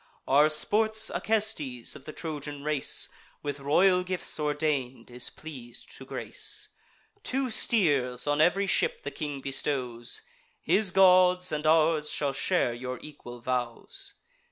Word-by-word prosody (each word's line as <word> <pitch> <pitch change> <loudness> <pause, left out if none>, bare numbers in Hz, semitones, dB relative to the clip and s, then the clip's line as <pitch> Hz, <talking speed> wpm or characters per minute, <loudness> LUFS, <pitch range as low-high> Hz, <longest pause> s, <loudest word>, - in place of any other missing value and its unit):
Our 145 +3 +5
sports 220 +7 +1
Acestes, 205 - -1
of 145 - -13
the 155 - -6
Trojan 145 -3 -6
race, 150 -2 +1 0.4
With 145 -1 -3
royal 180 +6 +3
gifts 180 -3 -1
ordain'd, 145 -5 -1
is 125 0 -2
pleas'd 130 -7 -11
to - - -10
grace: - - -2 0.5
Two 265 -1 -1
steers 145 - +1
on 145 +1 +2
ev'ry 195 +5 +3
ship 470 - +1
the - - -4
king 145 -3 -5
bestows; 130 -3 -3 0.4
His 205 -1 +2
gods 180 -1 +5
and 150 0 -1
ours 155 -1 +3
shall 140 -2 -1
share 135 -4 +1
your 125 +1 -5
equal 120 -5 -10
vows. 130 - -4
150 Hz, 130 wpm, -28 LUFS, 135-185 Hz, 0.5 s, Our